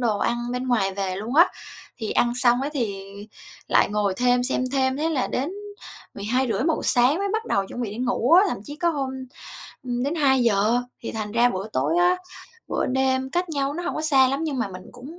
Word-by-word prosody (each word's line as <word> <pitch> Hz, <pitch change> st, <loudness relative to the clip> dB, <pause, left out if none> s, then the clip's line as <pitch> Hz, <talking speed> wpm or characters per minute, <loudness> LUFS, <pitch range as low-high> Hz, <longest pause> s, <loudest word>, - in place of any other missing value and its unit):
đồ 220 Hz, -4 st, +1 dB
ăn 240 Hz, -, 0 dB, 0.2 s
bên 250 Hz, +1 st, -3 dB
ngoài 195 Hz, -6 st, +1 dB
về 190 Hz, -2 st, -2 dB
luôn 220 Hz, +7 st, -5 dB
á. 340 Hz, +4 st, +7 dB, 0.5 s
Thì 220 Hz, -, -4 dB
ăn 240 Hz, 0 st, +2 dB
xong 245 Hz, 0 st, +3 dB
á 285 Hz, -, -1 dB
thì 205 Hz, -9 st, -3 dB, 0.6 s
lại -, -, +4 dB
ngồi 205 Hz, -2 st, 0 dB
thêm, 245 Hz, 0 st, +2 dB
xem 255 Hz, 0 st, 0 dB
thêm, 265 Hz, -1 st, +1 dB
thế 310 Hz, +3 st, 0 dB
là 285 Hz, -6 st, 0 dB
đến 275 Hz, +6 st, -2 dB, 0.6 s
12:30-1:00 255 Hz, +8 st, 0 dB
sáng 255 Hz, +6 st, +4 dB
mới 400 Hz, 0 st, -1 dB
bắt 445 Hz, +1 st, -1 dB
đầu 195 Hz, -1 st, 0 dB
chuẩn 245 Hz, -, -7 dB
bị 210 Hz, -, -3 dB
đi 210 Hz, -, -7 dB
ngủ 250 Hz, +2 st, 0 dB
á, 365 Hz, +3 st, +8 dB
thậm -, -, -3 dB
chí 290 Hz, +5 st, -8 dB
có 340 Hz, +1 st, +1 dB
hôm, 275 Hz, -4 st, -2 dB, 0.8 s
ừm, 245 Hz, -1 st, -2 dB
đến 285 Hz, +5 st, -1 dB
2:00 240 Hz, -7 st, +3 dB, 0.2 s
thì -, -, -6 dB
thành 215 Hz, -2 st, -4 dB
ra 240 Hz, +1 st, +4 dB
bữa 195 Hz, -1 st, -4 dB
tối 335 Hz, -, 0 dB
á, 355 Hz, +1 st, +4 dB, 0.5 s
bữa -, -, -1 dB
đêm 265 Hz, 0 st, 0 dB
cách 355 Hz, +3 st, -1 dB
nhau 280 Hz, -2 st, -1 dB
nó 350 Hz, -, -4 dB
hổng 350 Hz, -, -3 dB
có -, -, -2 dB
xa 270 Hz, -4 st, +4 dB
lắm 275 Hz, +5 st, -1 dB
nhưng 285 Hz, -4 st, -2 dB
mà 225 Hz, -4 st, -1 dB
mình 185 Hz, -1 st, -9 dB
cũng 290 Hz, +8 st, -11 dB
255 Hz, 220 wpm, -24 LUFS, 230-290 Hz, 0.8 s, á